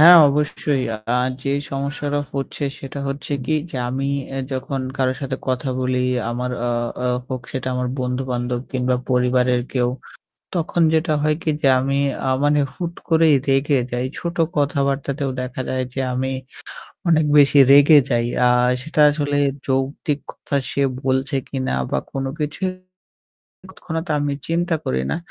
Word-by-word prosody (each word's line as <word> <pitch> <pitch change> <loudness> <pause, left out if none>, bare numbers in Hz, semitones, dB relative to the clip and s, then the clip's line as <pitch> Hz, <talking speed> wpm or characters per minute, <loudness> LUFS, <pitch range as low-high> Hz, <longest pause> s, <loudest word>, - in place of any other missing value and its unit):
হ্যাঁ, 175 +2 +10
অবশ্যই। 145 -2 0 0.3
আর 125 +1 +1
যেই 140 +1 0
সমস্যাটা 145 +1 -2
হচ্ছে 140 +1 -3
সেটা 135 +1 -7
হচ্ছে 140 +1 -4
কি 155 - +1 0.2
যে 135 - -6
আমি 135 +2 -2 0.3
এ - - -1
যখন 130 +1 -3 0.2
কারো 130 -1 +2
সাথে 135 -1 -3
কথা 130 +1 -1
বলি 125 0 0 0.3
আমার 125 +1 -2 0.2
আ - - +1 0.4
আ - - +1 0.2
হোক 130 -2 -4
সেটা 130 -1 -3
আমার 125 0 -1
বন্ধু-বান্ধব 125 -1 -2
কিংবা 125 -1 +1
পরিবারের 125 0 +2
কেউ 125 -2 +1 0.7
তখন 170 0 0
যেটা 160 0 +2
হয় 150 0 +2
কি 155 - +1
যে 135 - +5
আমি 135 +1 0 0.5
মানে 145 0 +4
হুট 170 -1 -4
করেই 160 -2 +5
রেগে 135 +1 +3
যাই। 125 +1 -1
ছোট 170 0 -4 0.2
কথাবার্তাতেও 140 -1 0
দেখা 125 0 -5
যায় 130 0 -1
যে 135 - -2
আমি 130 +1 -1 0.8
অনেক 160 -2 +4
বেশি 145 0 +6
রেগে 145 +2 +8
যাই। 120 -1 +2 0.2
আর 125 0 +4 0.2
সেটা 155 +1 -1
আসলে 145 -1 -1 0.3
যৌক্তিক 135 +2 -1
কথা 140 - -4
সে 140 - 0 0.2
বলছে 130 +1 0
কিনা 135 -1 -2 0.2
বা - - +1
কোন 135 -1 -3
কিছুই 150 +5 -2 1.0
তৎক্ষণাৎ 165 -2 -5
আমি 145 -1 0
চিন্তা 170 +1 0
করি 65 0 0
না। - - 0
135 Hz, 150 wpm, -21 LUFS, 130-150 Hz, 1.0 s, হ্যাঁ